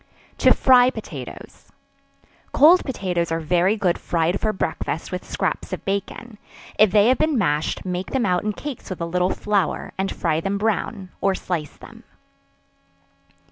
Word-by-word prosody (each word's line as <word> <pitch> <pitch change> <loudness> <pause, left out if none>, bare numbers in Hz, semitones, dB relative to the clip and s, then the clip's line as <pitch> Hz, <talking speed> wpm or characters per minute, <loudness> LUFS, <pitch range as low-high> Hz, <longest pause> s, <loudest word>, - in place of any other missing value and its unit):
To - - +5
Fry 250 -1 +5
Potatoes. - - -9 0.8
Cold 330 +6 +6
potatoes 180 -9 -2
are 165 - 0
very 180 +6 +1
good 180 -4 0
fried 170 +2 0
for 215 - +1
breakfast 165 -4 -3
with 180 0 -4
scraps - - -2
of - - -6
bacon; 205 +3 -4 0.4
if 215 0 +7
they 205 +3 +4
have 260 - +2
been 310 -3 +2
mashed, 150 -5 0
make 180 0 -3
them 265 -3 0
out 180 -1 +1
in 210 0 -1
cakes 285 +2 -7
with 185 - -5
a 170 - -2
little 180 +2 0
flour, 200 -7 -1
and 195 0 -1
fry 160 -1 -1
them 195 +3 -2
brown, 205 -2 -2
or 195 -1 +2
slice 165 -7 -4
them. - - -14
195 Hz, 160 wpm, -22 LUFS, 175-215 Hz, 0.8 s, if